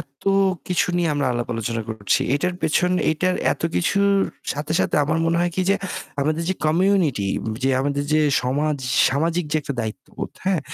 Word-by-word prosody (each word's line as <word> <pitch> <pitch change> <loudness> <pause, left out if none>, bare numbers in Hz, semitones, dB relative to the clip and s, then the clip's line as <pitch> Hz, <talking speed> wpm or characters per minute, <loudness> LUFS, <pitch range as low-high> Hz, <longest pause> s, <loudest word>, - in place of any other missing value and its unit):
এত 140 -3 -14 0.5
কিছু 180 - +2
নিয়ে 170 -2 +1
আমরা 145 -2 0
আলাপ 120 0 -3
আলোচনা 115 0 -2
করছি। 110 -2 0
এটার 180 +5 0
পেছন 180 +3 +2 0.2
এইটার 180 +4 +1 0.2
এত - - -8
কিছুর 200 +3 +2 0.4
সাথে, 150 +2 -4
সাথে - - 0
আমার 160 +2 0
মনে 170 - +2
হয় 175 - +1
কি 185 - 0
যে - - +5 0.5
আমাদের 155 +3 0
যে 190 - +1
কমিউনিটি 165 - +2 0.3
যে 135 - +2
আমাদের 140 +1 -1
যে 155 - +4 0.2
সমাজ 145 +4 0 0.3
সামাজিক 165 +5 0
যে 155 - +3
একটা 140 -1 -4
দায়িত্ববোধ 110 -2 -6
হ্যাঁ? 185 -4 +1
155 Hz, 175 wpm, -22 LUFS, 135-175 Hz, 0.5 s, যে